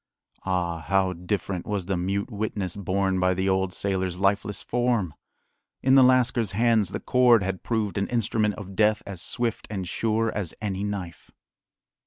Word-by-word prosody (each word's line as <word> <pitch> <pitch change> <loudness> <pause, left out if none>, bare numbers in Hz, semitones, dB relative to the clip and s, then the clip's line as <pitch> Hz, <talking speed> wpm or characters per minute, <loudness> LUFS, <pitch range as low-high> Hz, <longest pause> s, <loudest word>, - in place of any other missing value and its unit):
Ah, 90 -3 -1
how 95 +2 +1
different 90 +1 -3
was 100 -3 -2
the 95 +1 -1
mute 100 +5 -2
witness 100 -4 -3
borne 95 -1 0
by 90 0 +2
the 95 +1 -1
old 95 -1 +1
sailor's 95 -2 -2
lifeless 100 +1 0
form! 120 -9 0 0.7
In 130 - +4
the 135 - +8
lascar's 120 -4 +3
hands 110 -2 +3
the - - -4
cord 125 -4 +4
had 95 -1 -3
proved 105 -5 -1
an 100 - -1
instrument 110 -3 0
of 95 -1 -9
death 105 0 +2
as 95 -4 -6
swift 120 +1 -1
and 95 -4 -4
sure 115 +4 0
as 95 -6 -4
any 100 -2 -3
knife. 95 -5 -5
100 Hz, 165 wpm, -25 LUFS, 95-110 Hz, 0.7 s, the